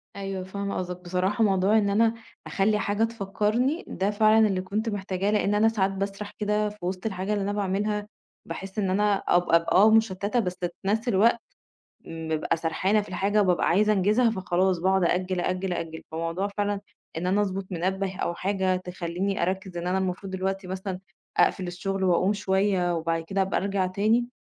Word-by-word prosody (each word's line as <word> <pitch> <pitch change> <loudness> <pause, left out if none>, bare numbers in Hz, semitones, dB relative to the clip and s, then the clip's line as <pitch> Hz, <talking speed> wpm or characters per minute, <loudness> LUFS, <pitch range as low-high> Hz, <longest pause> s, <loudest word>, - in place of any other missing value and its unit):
أيوه 195 -1 -4
فاهمة 200 +1 -4
قصدك. 180 -1 -4
بصراحة 185 +5 0
موضوع 195 +1 +3
إن 205 -2 +2
أنا 225 +3 +3 0.3
أخلّي 210 +2 +1
حاجة 205 +1 0
تفكّرني، 225 - 0
ده 195 +2 -1
فعلًا 215 +1 +5
اللي 190 -2 -1
كنت 210 +5 -2
محتاجاه، 195 -1 -2
لإن 205 -1 +1
أنا 215 +2 +4
ساعات 195 -3 0
باسرَح 195 +1 -4
كده 210 0 +1
في 210 - -13
وِسط 185 +2 -4
الحاجة 195 -1 -2
اللي 205 -1 -1
أنا 200 +1 -1
باعملها 205 +1 -1 0.4
باحِس 195 +2 -6
إن 195 -2 0
أنا 205 +2 +2
أب 175 -2 +1
أب 170 0 +6
آه 205 +4 +6
مُشتّتة 220 0 +2
بس 185 -5 -2
في 175 - 0 0.2
نفس 220 +4 0
الوقت 230 +2 +4 0.7
م 165 -1 -6
بابقى 160 0 0
سرحانة 185 +6 +1
في 210 - -8
الحاجة 200 +3 +1
وبابقى 180 -3 +2
عايزة 210 +4 +3
أنجزها، 210 +5 +3
فخلاص 190 -3 +1
باقعد 190 +1 +2
أأجِّل، 180 +1 0
أأجِّل، 185 +1 -1
أأجِّل. 165 -2 -5
فموضوع 165 +4 -2
فعلًا 205 -1 0 0.4
إن 175 - -3
أنا 195 +3 +2
أضبُط 195 -1 -2
منبه 190 +2 -2
أو 175 - -2
حاجة 190 0 0
تخلّيني 180 +1 -3
أركِّز 185 0 -2
إن 170 0 -4
أنا 185 +1 +1
المفروض 190 +1 -3
دلوقتي 190 +1 -2
مثلًا 190 0 -4 0.4
أقفل 185 - +2
الشُغل 190 +2 -3
وأقوم 185 +2 +3
شوية 190 -3 +1
وبعد 165 0 -1
كده 195 +4 -1
أبقى 190 - 0
أرجع 195 -1 0
تاني، 215 +6 +1
195 Hz, 180 wpm, -26 LUFS, 185-205 Hz, 0.7 s, أب